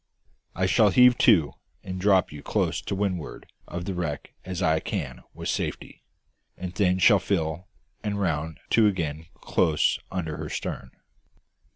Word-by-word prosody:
I 95 - +1
shall 105 +3 +4
heave 125 +3 +6
to, 85 - +5 0.3
and 95 0 -5
drop 95 -2 +3
you 75 - -8
as - - -14
close - - 0
to - - -4
windward 95 -5 -3 0.2
of 85 0 -5
the 95 - -3
wreck 80 -5 -4
as 90 0 -4
I 80 -2 +3
can 65 -5 -4
with - - -6
safety; - - -3 0.6
and 90 -1 -6
then 90 -2 +2
shall 100 +2 +6
fill, 90 -2 -2 0.4
and 100 -1 -2
round 80 -4 -2
to 110 -2 +5
again 80 -5 -2
close 75 -2 +2
under 80 -5 -3
her - - -5
stern." 65 - -5
90 Hz, 160 wpm, -26 LUFS, 80-100 Hz, 0.6 s, heave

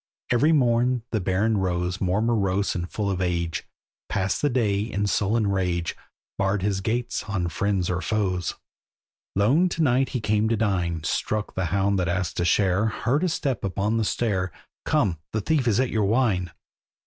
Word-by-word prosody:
Every 140 +6 +4
morn 125 -4 +2
the 110 - +1
Baron 100 +4 +1
rose 90 0 -1
More 95 +3 +1
morose 100 -4 +1
and 90 0 -4
full 100 -2 -1
of 95 -1 -2
age; 85 -2 -1 0.4
Passed 95 0 0
the 145 - +2
day 110 -6 +1
in 105 -1 -2
sullen 105 +2 +1
rage, 90 -4 -1 0.4
Barred 95 0 +1
his 100 -1 0
gates 120 +4 -2
on 90 -4 -1
friends 95 -1 0
or 90 0 -1
foes. 95 -5 -1 0.8
Lone 135 - +3
to 165 -2 -1
night 130 -1 +2
he 130 - -2
came 105 0 +1
to 115 - +1
dine, 90 -7 0
Struck 105 +6 -1
the 95 - -1
hound 100 +3 +1
that 90 - 0
asked 90 -1 -1
a 85 - +1
share, 95 +4 +3
Heard 125 - 0
a 185 - +2
step 140 -7 -2
upon 100 +3 0
the 115 - +1
stair— 100 -4 0 0.3
"Come, 85 -5 +1
the 110 - 0
thief 140 +2 +1
is 110 0 +3
at 130 -1 +1
your 110 -2 +1
wine!" 100 -5 +1
100 Hz, 180 wpm, -25 LUFS, 90-115 Hz, 0.8 s, Every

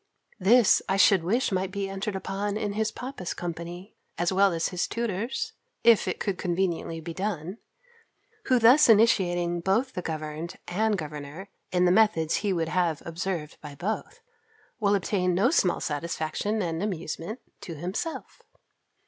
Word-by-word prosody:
This 220 +3 +5
I 195 - +2
should 195 -2 +5
wish 225 +9 +1
might 190 0 0
be 200 0 -3
entered 195 +1 -4
upon 200 +2 -3
in 205 -1 -2
his 220 +1 0
papa's 250 -9 -6
company, 175 +3 -6 0.2
as 175 +2 +1
well 195 +1 +4
as 165 -1 -1
his 180 -2 -1
tutor's, 235 - -3 0.3
if 230 -2 +5
it - - -2
could 195 -3 -2
conveniently 175 -2 -1
be 165 +1 -6
done; 190 +1 -4 0.9
who 255 - +4
thus 245 +5 +6
initiating 175 -6 +4
both 225 +9 +1
the 180 - -3
governed 155 +1 -5
and 210 +3 +1
governor 150 +3 -7 0.2
in 180 0 +3
the 175 - +4
methods 185 -6 +3
he 205 -1 -1
would 165 -3 -1
have 170 -4 0
observed 165 -2 -4
by 150 -2 -9
both, 195 +10 -4 0.6
will 205 -2 +3
obtain 185 -2 0
no 215 +9 +3
small 185 - +2
satisfaction 165 +7 -2
and 165 -1 -2
amusement 185 +2 -4 0.2
to 165 - -7
himself. 185 - -5
190 Hz, 155 wpm, -27 LUFS, 170-210 Hz, 0.9 s, thus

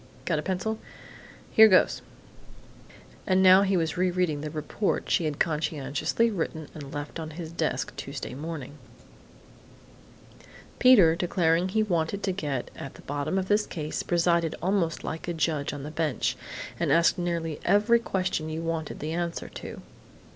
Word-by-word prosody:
Got 165 -4 +1
a - - -2
pencil?... 195 +5 -2 0.7
Here 220 0 +9
goes!" 185 -3 +4 1.3
And 190 -1 +4
now 185 +1 +8
he 195 -1 +2
was 165 0 -1
re 185 +1 +2
reading 175 -5 0
the 155 - -4
"report" 155 +6 -2
she 170 - +2
had 150 -2 -2
conscientiously 155 +7 0
written 160 -5 -3
and 145 -3 -9
left 145 +3 -5
on 160 -1 -5
his 165 -2 -6
desk 165 -2 -2
Tuesday 140 -1 -6
morning: 150 0 -7 2.0
"Peter, 205 -11 +7
declaring 175 0 +1
he 215 +3 +2
wanted 180 0 -1
to 190 - +1
get 145 -9 -3
at 135 - -8
the - - -14
bottom 145 +5 -2
of 190 -1 -1
this 210 +1 +2
case, 155 -3 -4
presided 170 -1 +1
almost 180 -2 0
like 160 +2 -5
a 175 - -2
judge 155 -3 0
on 145 -2 -6
the 150 - -6
bench, 155 -4 -1 0.4
and - - +1
asked 170 +3 +4
nearly 170 -3 -2
every 215 +4 +4
question 185 -7 -2
you 160 +1 -4
wanted 165 -2 -3
the 155 +2 -3
answer 170 0 -3
to. - - -9
165 Hz, 160 wpm, -27 LUFS, 155-185 Hz, 2.0 s, Here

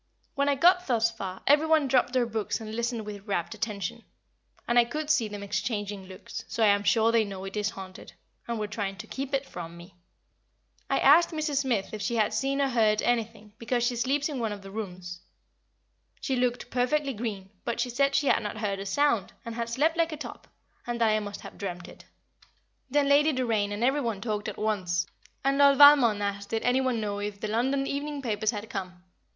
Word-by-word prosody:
When 280 0 +1
I 285 - +3
got 360 +5 +4
thus 230 -3 +2
far 190 -4 -7
every 295 +3 +4
one 315 -3 +3
dropped 250 -1 +3
their 255 -2 +3
books 220 -1 -2
and 215 -1 -7
listened 235 -1 -2
with 205 0 -8
rapt 170 -4 -1
attention, 210 -4 -4 0.6
and 240 0 +4
I - - +7
could 300 +6 -2
see 245 -8 +2
them 205 -1 -7
exchanging 205 -2 -3
looks, 185 -1 -8
so 225 - -1
I 215 - +6
am 200 0 +3
sure 225 +2 +3
they 230 -1 +4
know 195 -2 -7
it 195 - -7
is 210 -1 0
haunted, 190 -2 -10 0.3
and 235 -1 -2
were 215 - -2
trying 205 -2 -4
to 180 - -9
keep 270 0 -5
it 275 0 -1
from 170 -7 -8
me. 175 +2 -13 1.0
I 275 - +2
asked 315 +5 +6
Mrs. 310 -3 -2
Smith 245 -9 0
if 215 - -5
she 235 +2 -1
had 215 -1 +2
seen 270 +5 0
or 275 - +2
heard 220 -3 +2
anything, 225 -3 -1
because 240 +1 0
she 245 0 +1
sleeps 275 +5 0
in 290 -5 -4
one 225 -2 -1
of 205 -1 -7
the 195 - -10
rooms. 180 -4 -6 1.0
She 265 - -1
looked 245 -1 -1
perfectly 275 +3 +1
green, 205 -4 -5
but 235 -1 -3
she 245 +1 0
said 275 +3 +2
she 285 - +2
had - - +3
not 210 0 -5
heard 200 -2 -2
a 195 - -5
sound, 230 -3 +1
and 230 - -5
had 230 0 -3
slept 305 +8 +1
like 330 -1 +2
a 310 - -5
top, 295 - -9 0.4
and 240 0 -2
that 225 -1 +4
I 215 - +2
must 205 -1 -7
have - - -11
dreamt 180 -3 -5
it. - - -14 0.8
Then 285 +1 +2
Lady 295 +2 +4
Doraine 225 -6 0
and 205 +3 -3
every 270 +4 +2
one 230 -6 -2
talked 210 -1 -3
at - - -5
once, 185 -5 0 0.4
and 275 +1 +2
Lord 280 -1 +6
Valmond 265 -8 +7
asked 200 0 -3
did 225 0 -2
any 250 +2 +3
one 255 -3 0
know 205 -1 -3
if 205 0 -4
the 215 - -3
London 260 +6 0
evening 285 0 -3
papers 215 -3 0
had 210 -1 -3
come. 185 -4 -6
230 Hz, 220 wpm, -28 LUFS, 205-270 Hz, 1.0 s, I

